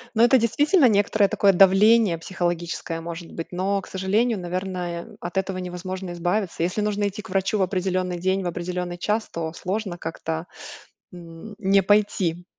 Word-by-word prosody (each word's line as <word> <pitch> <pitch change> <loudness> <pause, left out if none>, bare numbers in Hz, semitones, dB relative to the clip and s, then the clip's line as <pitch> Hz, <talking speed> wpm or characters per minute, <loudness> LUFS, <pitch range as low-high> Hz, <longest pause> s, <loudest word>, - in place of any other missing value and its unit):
Ну, 225 - +4
это 240 +3 +6
действительно 285 - +3
некоторое 205 -1 +3
такое 195 0 +3
давление 195 +1 +5
психологическое, 175 -1 -3
может 165 0 -7
быть, 165 - -6
но, 195 +2 -1
к - - -13
сожалению, 205 +4 0
наверное, 180 -1 -4
от 175 +2 -3
этого 190 0 -2
невозможно 185 0 -5
избавиться. 175 +1 -1
Если 180 +5 0
нужно 205 -1 0
идти 205 +2 -7
к - - -12
врачу 195 +2 0
в 195 - +2
определённый 185 -1 -1
день, 190 +2 0
в - - -5
определённый 175 0 -4
час, 215 +4 -1
то 160 -1 -4
сложно 190 0 -3
как-то, 165 0 -5 0.7
м, 175 +4 -11
не 195 -1 +3
пойти. 190 -4 +1
185 Hz, 160 wpm, -24 LUFS, 175-205 Hz, 0.7 s, это